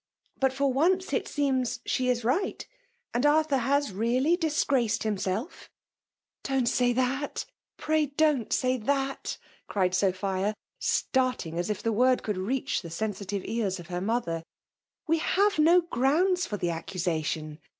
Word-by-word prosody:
But 265 -1 +3
for 275 0 0
once, 360 +4 +2
it - - +1
seems^ 265 -4 0
she 255 0 0
is 245 -1 +1
right; 330 - -1 0.5
and 240 +2 0
Arthur 295 -1 +3
has 280 +1 +1
really 245 - +2
disgraced 275 - +1
himself 210 - -3 0.7
1'* - - -64 0.2
''Don't - - -2
say 245 +1 +3
that 260 +3 -1 0.2
— - - -66
pray 310 -1 +1
don't 285 -4 +1
say 255 0 +2
that 270 +3 -2 0.2
/" - - -32
cried 185 -3 +1
Sophia, 190 +2 0 0.2
starthig 255 -11 0
as 175 +3 -2
if 210 - -3
the 230 - +1
word 255 +3 +3
could 210 -3 -2
reach 245 +8 -1
fthe 170 -3 -9
sensitive 200 0 -3
ears 205 -5 -1
of 170 - -11
her 175 0 -3
mother. 195 -6 -1 0.6
We 325 +1 +2
have 400 +2 +2
no 340 +4 +6
gi*o\mds 340 +5 +1
for 210 - -3
the 175 -3 -1
accusation. 160 -2 -3
250 Hz, 155 wpm, -28 LUFS, 200-285 Hz, 0.7 s, no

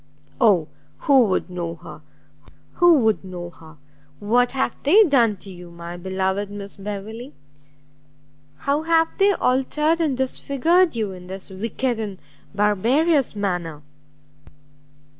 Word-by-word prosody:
Oh 200 - +4 0.3
who 270 -4 +5
would 190 -3 -1
know 175 -2 -5
her! - - -12 0.8
who 350 -2 +6
would 220 -3 +1
know 175 -2 -7
her! 160 -2 -16 0.4
what 245 +5 +2
have 265 -3 -1
they 385 +10 +6
done 240 - +3
to 195 +1 -11
you, 175 -1 -11
my 170 0 -9
beloved 190 +2 -2
Miss 200 -1 -7
Beverley? 210 +6 -7 1.2
how 280 - 0
have 325 0 +1
they 400 +1 +5
altered 300 +3 +1
and 290 -6 0
disfigured 280 +6 +1
you 215 -4 -2
in 180 -1 -11
this 190 +1 -8
wicked 230 +5 -2
and 205 -3 -5 0.4
barbarous 240 - +2
manner?" 175 -7 -3
215 Hz, 125 wpm, -22 LUFS, 190-275 Hz, 1.2 s, who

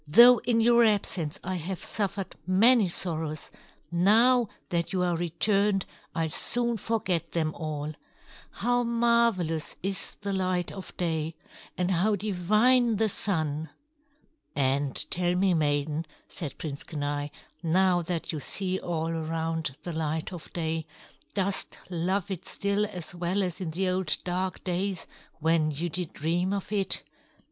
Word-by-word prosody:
"Though 240 +9 +8
in 230 -1 +1
your 235 +1 +6
absence 190 -7 +1
I 185 0 -2
have 180 +2 -4
suffered 200 -2 -2
many 215 +3 +6
sorrows, 160 -3 -2 0.4
now 225 +7 +5 0.2
that 170 -1 0
you 185 -1 +1
are 175 -1 +1
returned, 195 +4 +1 0.3
I'll 165 -1 +1
soon 235 +7 0
forget 210 -6 -1
them 155 -2 0
all. 155 -1 -4 0.6
How 245 0 +1
marvelous 235 -9 +1
is 195 0 -2
the 200 0 -2
light 185 -2 0
of 190 - -9
day! 160 -2 -1 0.4
And 180 +1 +1
how 195 +4 +3
divine 215 +5 +3
the 220 +1 +1
Sun!" 160 -6 -1 0.9
"And 140 0 +1 0.2
tell 175 0 +2
me, 190 0 +3
maiden," 150 0 0 0.2
said 155 -6 -6
Prince 145 -3 -5
Kenai, 145 -2 -3 0.3
"now 180 +1 +3
that 170 -1 -2
you 155 - -3
see 185 +5 -1
all 165 -2 -2
around 160 -2 -2
the 175 - -4
light 160 +2 -2
of 175 - -9
day, 160 -1 -2 0.5
dost 195 -1 0
love 185 +3 -1
it 185 -1 -4
still 200 +1 0
as 180 -6 -6
well 180 +3 0
as 180 0 -4
in 175 - -2
the 185 +4 +1
old 185 -4 +1
dark 185 +1 -2
days 185 +1 -2 0.4
when 160 0 +3
you 155 +4 -2
did 175 0 -1
dream 175 +5 0
of 200 0 -4
it?" 195 -2 +1
180 Hz, 145 wpm, -28 LUFS, 160-200 Hz, 0.9 s, Though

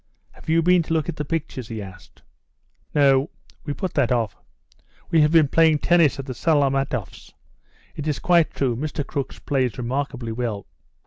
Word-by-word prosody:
Have - - -13
you 165 +1 +3
been 180 +1 +4
to 165 - -3
look 160 +1 -1
at 165 - -5
the 150 - -2
pictures?" 150 -6 -4
he 115 -2 -6
asked. 95 -4 -12 0.7
"No, 140 -1 +4 0.4
we 145 - -3
put 185 -3 -4
that 140 -5 +1
off. 115 -3 0 0.8
We 165 - +5
have 150 0 +4
been 160 -3 +5
playing 160 +1 +4
tennis 160 -3 +3
at 135 - -6
the 130 - -5
Salamatoffs'. 135 - -1 0.6
It 150 - -5
is 150 - 0
quite 170 -3 +3
true, 130 -4 -1
Mr. 145 +2 -3
Crooks 140 -1 -4
plays 130 -5 -1
remarkably 125 -1 -3
well." 110 -4 -3
140 Hz, 175 wpm, -23 LUFS, 125-160 Hz, 0.8 s, We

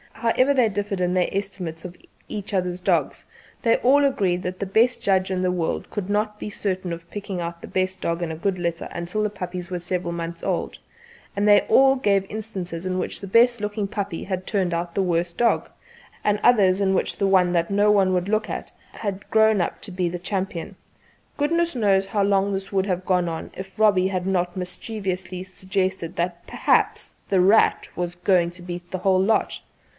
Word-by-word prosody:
However 240 +4 +2
they 250 -5 +3
differed 205 -1 -3
in 180 0 +1
their 180 -1 +2
estimates 185 -5 -4
of 180 0 -7 0.3
each 205 -1 -6
other's 180 -1 -1
dogs, 185 - 0 0.4
they 230 - +4
all 280 +3 +4
agreed 190 -10 +1
that 185 0 -4
the 200 - -2
best 230 +6 +2
judge 190 -1 +2
in 185 -1 0
the 180 - +2
world 175 -3 -2
could 200 -2 -4
not 210 0 0
be - - -5
certain 185 -4 -2
of 170 0 -9
picking 200 -3 -5
out 170 0 -5
the - - -8
best 185 0 -1
dog 170 +1 -1
in 170 -2 -2
a - - -4
good 185 +3 -1
litter 170 -1 -2
until 170 +5 -3
the 210 - 0
puppies 180 -2 -6
were 180 - -2
several 175 0 -2
months 170 0 -5
old; - - -2 0.6
and 205 +1 +1
they 205 0 +7
all 270 0 +5
gave 200 -6 +1
instances 185 -5 -5
in 185 0 -1
which - - -3
the 200 - -6
best 235 +3 +4
looking 210 0 -2
puppy 200 -4 -4
had 185 -1 -4
turned 185 -4 0
out 170 0 -3
the 195 - +1
worst 170 -1 -1
dog, 235 -1 +2 0.5
and 210 0 +2
others 200 -5 +5
in 190 -1 +2
which 190 - 0
the 200 - +1
one 185 -2 +4
that 170 +1 +1
no 205 +1 +4
one 195 -2 +3
would 180 +1 0
look 215 +1 0
at - - -5 0.2
had 200 -3 -5
grown 220 -1 +4
up 175 - -2
to 205 - -4
be 180 -1 -1
the 175 +1 -5
champion. 190 0 -3 0.6
Goodness 335 +2 +1
knows 195 -4 +2
how 200 0 0
long 200 0 +2
this 195 0 -4
would 195 -1 +1
have 185 -2 -2
gone 180 -2 +2
on 165 -1 -6
if 190 +2 -9
Robbie 200 -4 +4
had 185 -1 -2
not 180 -1 0
mischievously 185 -1 -4
suggested 185 -2 -3
that 175 0 -3
"perhaps - - +1 0.2
'The 190 -2 +3
Rat' 200 +5 +4
was 175 0 -3
going 175 -1 +2
to 175 +1 -12
beat 175 0 -7
the 185 - -3
whole 185 0 +3
lot." 220 +4 +1
190 Hz, 205 wpm, -23 LUFS, 180-205 Hz, 0.6 s, they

